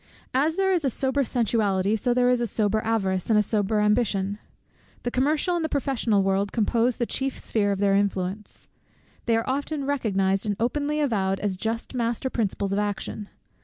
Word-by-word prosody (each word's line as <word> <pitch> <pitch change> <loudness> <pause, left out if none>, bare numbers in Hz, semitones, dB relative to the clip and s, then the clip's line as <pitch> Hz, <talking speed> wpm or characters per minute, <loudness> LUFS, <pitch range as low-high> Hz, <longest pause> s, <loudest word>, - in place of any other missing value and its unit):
As 295 +5 +2
there 385 0 +2
is 350 -4 +1
a 275 - +2
sober 265 +3 +1
sensuality, 215 -4 +1
so 220 +3 -1
is 240 - +3
there 250 0 +3
also 250 -1 +3
a 235 - +1
sober 215 0 +1
avarice, 195 -5 -1
and 220 - +4
a 210 - +4
sober 210 0 0
ambition. 210 -2 +1 0.6
The 245 - -2
commercial 300 +8 +1
and 340 - -1
the 315 - -1
professional 250 -8 +1
world 195 +1 0
compose 235 +2 +1
the 240 - 0
chief 270 +2 -2
sphere 205 -2 0
of 200 - -1
their 200 0 +2
influence. 195 0 -2 0.6
They 230 -1 +3
are 225 - -2
often 280 +2 -2
recognized 195 -8 0
and 205 - 0
openly 290 +6 0
avowed 195 -9 0
as 205 -2 -1
just 225 +6 -3
master 240 +1 -1
principles 200 -3 -1
of 200 - +1
action. 205 0 -3
225 Hz, 190 wpm, -25 LUFS, 200-260 Hz, 0.6 s, and